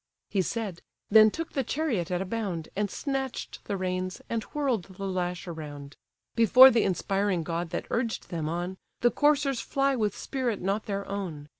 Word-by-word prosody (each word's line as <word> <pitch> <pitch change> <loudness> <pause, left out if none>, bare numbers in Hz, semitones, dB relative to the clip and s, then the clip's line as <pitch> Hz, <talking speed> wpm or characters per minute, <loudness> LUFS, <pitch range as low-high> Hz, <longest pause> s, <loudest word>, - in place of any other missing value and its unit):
He 195 - +2
said, 200 -3 -3 0.3
then 215 0 +8
took 330 +9 -5
the 270 - 0
chariot 235 - -1
at 180 +1 0
a - - -8
bound, 190 -6 -3
And 205 +1 0
snatch'd 270 +2 -3
the 200 - -2
reins, 185 0 -2
and 230 -1 0
whirl'd 265 -11 -1
the 195 +1 -8
lash 180 -1 -2
around: 145 -4 -7 0.4
Before 255 +4 +9
the 230 - +3
inspiring 195 -1 0
god 170 +1 -3
that - - -3
urged 230 -1 -1
them 160 -4 -2
on, 175 +3 -3 0.2
The 240 - +4
coursers 290 -3 +2
fly 275 0 +1
with 210 -4 -1
spirit 250 -5 -2
not 200 +4 -1
their 200 -1 -3
own. 170 -7 -5
200 Hz, 175 wpm, -28 LUFS, 180-235 Hz, 0.4 s, Before